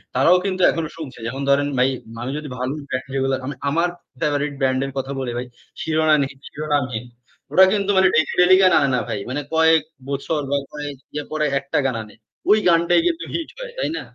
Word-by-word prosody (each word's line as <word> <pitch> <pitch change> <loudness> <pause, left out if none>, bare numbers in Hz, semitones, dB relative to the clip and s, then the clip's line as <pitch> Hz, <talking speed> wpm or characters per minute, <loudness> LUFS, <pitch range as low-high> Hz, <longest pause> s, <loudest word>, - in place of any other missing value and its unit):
তারাও 170 +8 +5
কিন্তু 185 -1 -1
এখনো 165 -2 -2
শুনছে। 140 -7 -8
যেমন 135 +4 -4
ধরেন 145 +1 +3
ভাই 130 +1 +4 0.3
মানুষ 125 +3 -4
যদি 150 -2 -8
ভালো 130 +2 -2 0.2
দেখে 130 +1 -3
এইগুলো 135 0 +1
আমি, 140 0 -4
আমার 170 +4 +1 0.3
ফেভারাইট 145 -1 0
ব্র্যান্ড 130 -1 +1
এর 135 - -5
কথা 135 +1 -3
বলি 125 -2 -3
ভাই 125 - -3 0.4
'Shironamhin', 155 -4 +2
'Shironamhin' 135 -6 -2 0.5
ওরা 190 - +8
কিন্তু 200 -1 0
মানে 190 0 +6
ডেইলি, 155 -1 +3
ডেইলি 180 +1 +7
গান 185 - +6
আনে 140 - +3
না - - +1
ভাই। 105 - -2
মানে 145 +3 -2
কয়েক 160 -1 +5 0.3
বছর 140 +3 -1
বা 140 - +3
কয়েক 145 -1 -6 0.2
ইয়া 150 0 -3
পরে 155 -1 0
একটা 140 +1 -3
গান 130 -3 0
আনে। 105 -1 -15 0.5
গানটাই 170 - +4
কিন্তু 335 -1 -1
হিট 330 - -3
হয়। - - -7
তাই - - -1
না? - - -4
145 Hz, 200 wpm, -21 LUFS, 135-165 Hz, 0.5 s, ওরা